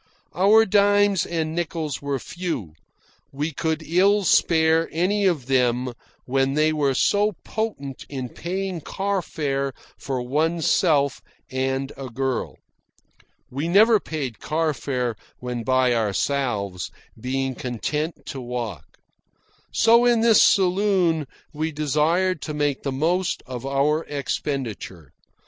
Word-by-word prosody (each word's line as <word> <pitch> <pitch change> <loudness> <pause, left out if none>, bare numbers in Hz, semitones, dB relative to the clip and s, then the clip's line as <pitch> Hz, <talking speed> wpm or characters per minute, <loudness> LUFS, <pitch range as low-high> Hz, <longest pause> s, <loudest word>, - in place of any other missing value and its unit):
Our 210 +5 +5
dimes 205 -1 +3
and 160 -2 -2
nickels 160 -3 -3
were 140 -1 -1
few. 145 - -5 0.6
We 150 +4 -3
could 160 +2 -2
ill 195 +5 +3
spare 160 -2 +3
any 195 +5 +1
of 160 -9 0
them 125 -1 +1 0.3
when 135 +1 +1
they 155 +1 +3
were 140 -3 +1
so 205 +8 +2
potent 170 - -4
in 130 -3 -5
paying 185 +2 -4
car 195 +4 -2
fare 140 -4 -2 0.3
for 135 -2 -3
oneself 155 +1 +1 0.3
and 130 +1 -1
a 135 -1 -7
girl. 130 +1 -3 0.9
(We 140 +5 -2
never 215 +5 +5
paid 140 - -5
car 155 0 0
fare 125 -4 -2 0.2
when 125 -1 -4
by 130 +1 +2
ourselves, 105 -3 -1 0.3
being 130 +3 -2
content 150 +7 -3
to 135 - -6
walk.) 120 - -6 0.7
So, 235 +1 +5
in 240 -2 +4
this 230 -1 +6
saloon, 185 -5 +3 0.3
we 155 +2 -2
desired 155 +4 +1
to 150 - -5
make 145 -2 0
the 140 - -2
most 170 +7 0
of 130 0 -6
our 145 +3 +1
expenditure. 130 - -4
150 Hz, 120 wpm, -23 LUFS, 130-175 Hz, 0.9 s, this